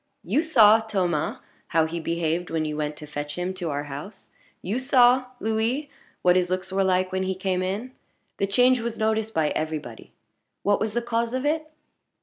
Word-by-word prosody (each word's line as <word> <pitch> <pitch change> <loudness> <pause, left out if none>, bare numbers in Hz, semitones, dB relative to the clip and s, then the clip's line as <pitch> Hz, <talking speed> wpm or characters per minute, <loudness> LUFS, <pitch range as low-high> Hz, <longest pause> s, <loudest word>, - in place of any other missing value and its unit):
You 300 - +1
saw, 225 -10 +6
Thomas, 185 -8 -1 0.3
how 160 -1 +2
he 165 +1 -4
behaved 170 +1 -1
when 160 -1 -1
you 150 -1 -3
went 150 0 -2
to 150 - -8
fetch 145 0 -5
him 180 +1 -2
to 180 -3 -4
our 145 0 -2
house. 145 +8 -9 0.3
You 210 +7 -1
saw, 255 -1 +5
Louis, 230 +7 -1 0.3
what 180 0 +5
his 180 -1 +2
looks 185 +1 -2
were 195 0 +2
like 185 0 +1
when 190 0 -1
he 190 0 -1
came 185 -1 -1
in. 200 +7 -3 0.5
The 200 - 0
change 250 +5 +4
was 235 0 -4
noticed 220 0 0
by 155 -2 +2
every 155 0 -2
body 120 -7 -11 0.5
what 205 0 +2
was 220 -1 -2
the 240 - 0
cause 235 +1 -1
of 260 +2 -2
it? 310 +1 0
190 Hz, 195 wpm, -25 LUFS, 165-230 Hz, 0.5 s, saw